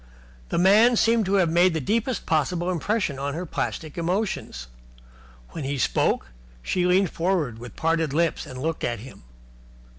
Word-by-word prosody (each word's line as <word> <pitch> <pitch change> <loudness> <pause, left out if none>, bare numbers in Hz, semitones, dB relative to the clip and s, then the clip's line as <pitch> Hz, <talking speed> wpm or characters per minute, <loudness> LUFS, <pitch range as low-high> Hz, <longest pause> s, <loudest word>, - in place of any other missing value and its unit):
The - - -1
man 210 +7 +5
seemed 225 -2 +3
to 195 - +2
have 180 -4 +3
made 175 +1 +4
the - - 0
deepest 230 - -1
possible 170 +3 0
impression 185 -3 -1
upon 140 +1 -3
her 175 +2 -4
plastic 155 -1 -4
emotions. 180 - -2 0.8
When 160 - -6
he 140 +1 -2
spoke, 65 - 0 0.3
she 180 - 0
leaned 185 0 +3
forward 165 -10 -1
with 120 0 -10
parted 165 -2 0
lips 165 +2 0
and 130 - -8
looked 160 +3 -3
at 120 -3 -2
him. 130 - -12
170 Hz, 160 wpm, -24 LUFS, 145-190 Hz, 0.8 s, man